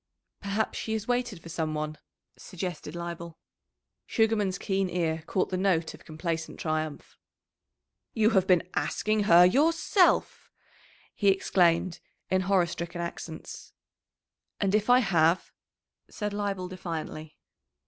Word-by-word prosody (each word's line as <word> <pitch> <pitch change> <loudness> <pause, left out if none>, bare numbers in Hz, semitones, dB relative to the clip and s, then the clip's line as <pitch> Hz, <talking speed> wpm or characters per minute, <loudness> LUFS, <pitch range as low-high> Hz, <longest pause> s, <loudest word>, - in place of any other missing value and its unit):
"Perhaps 200 +2 -1
she 220 - -3
has 220 -1 -3
waited 245 -7 -1
for 170 - -10
some 160 -2 -2
one," 155 0 -3 0.4
suggested 180 -3 -6
Leibel. 170 -1 -6 0.7
Sugarman's 215 -4 +1
keen 195 -1 -1
ear 165 -2 -1
caught 185 - 0
the 185 - 0
note 180 -4 +1
of - - -15
complacent 165 +1 -4
triumph. 155 -2 -3 1.0
"You 220 0 +4
have 190 -3 +3
been 180 -1 +3
asking 215 -1 0
her 175 -2 +8
yourself!" 325 - +3 0.6
he 200 - -1
exclaimed 180 -2 +3 0.3
in 185 0 +3
horror 185 -1 +3
stricken 170 +1 -6
accents. 170 -1 -7 0.9
"And 195 -1 +1
if 215 +2 +1
I 250 +1 +7
have?" 170 -4 +2 0.6
said 210 -1 -4
Leibel 200 -3 -2
defiantly. 160 -4 -6
185 Hz, 125 wpm, -28 LUFS, 165-205 Hz, 1.0 s, her